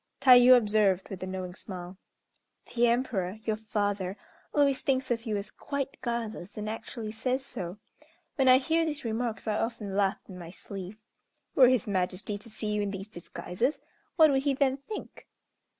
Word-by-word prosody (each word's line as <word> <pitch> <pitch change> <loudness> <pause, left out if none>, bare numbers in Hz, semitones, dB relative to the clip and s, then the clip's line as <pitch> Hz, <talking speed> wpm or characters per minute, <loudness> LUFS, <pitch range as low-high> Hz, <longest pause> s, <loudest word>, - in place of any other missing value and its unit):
Tayû 255 -1 +8
observed, 205 -4 +2
with 190 -3 -7
a 185 - -4
knowing 185 -1 -5
smile, 180 -1 -8 0.8
"The 240 0 +4
Emperor, 230 -6 0
your 220 - +1
father, 205 -3 -2 0.3
always 280 -2 +3
thinks 265 -4 0
of 230 -1 -1
you 215 -2 0
as 200 +1 -5
quite 280 -2 -4
guileless, 230 -6 -4
and 210 0 -4
actually 220 0 -5
says 255 +4 -2
so. 180 -7 -6 0.6
When 270 -3 +2
I 255 0 +9
hear 325 +5 +1
these 300 -5 -3
remarks 225 0 -2
I 215 0 +1
often 210 -4 -3
laugh 195 -1 +2
in 180 -1 -10
my 170 -1 -8
sleeve. 195 +2 -8 0.6
Were 260 -2 +7
his 255 -5 +2
Majesty 195 +1 -1
to 230 - -11
see 215 -1 -4
you 210 - 0
in 205 - -1
these 195 +1 -6
disguises, 210 - -3 0.4
what 315 -3 +7
would 270 -1 +2
he 275 -1 +1
then 270 -1 +2
think?" 280 +10 -9
220 Hz, 175 wpm, -29 LUFS, 195-255 Hz, 0.8 s, I